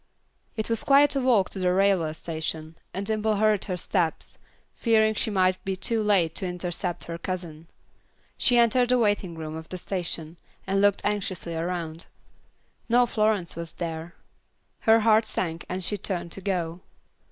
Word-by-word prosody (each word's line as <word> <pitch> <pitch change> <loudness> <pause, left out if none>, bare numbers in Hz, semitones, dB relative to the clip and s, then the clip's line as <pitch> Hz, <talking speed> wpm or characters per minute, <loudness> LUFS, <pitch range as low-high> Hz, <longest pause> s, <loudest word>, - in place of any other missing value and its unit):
It 220 - -1
was 230 -1 0
quite 285 +1 +5
a 275 - +1
walk 235 -7 +3
to 195 - -5
the 180 -1 +2
railway 185 -4 +2
station, 160 0 -5 0.2
and 195 +2 -4
Dimple 215 0 0
hurried 210 -1 +2
her 185 -3 -3
steps, 175 -3 -2 0.3
fearing 220 -2 +3
she 220 - 0
might 185 -2 +1
be 190 -1 -2
too 220 +4 -1
late 195 -6 +3
to 190 - -3
intercept 180 0 -3
her 170 0 -6
cousin. 170 -4 -6 0.7
She 245 - +3
entered 240 +1 +4
the 250 - +4
waiting 205 -6 +1
room 155 -1 -6
of 160 0 -8
the 185 - -5
station, 170 -3 -4 0.3
and 195 +1 +1
looked 205 -1 +3
anxiously 190 -5 -2
around. 165 -1 -4 0.8
No 245 +1 +5
Florence 215 -6 0
was 170 0 -6
there. 165 0 -5 0.7
Her 225 0 +7
heart 220 0 +5
sank 170 -6 -3
and 185 +1 -3
she 205 +4 -1
turned 175 -3 -4
to 195 - -6
go. 175 -3 -2
185 Hz, 165 wpm, -26 LUFS, 170-215 Hz, 0.8 s, Her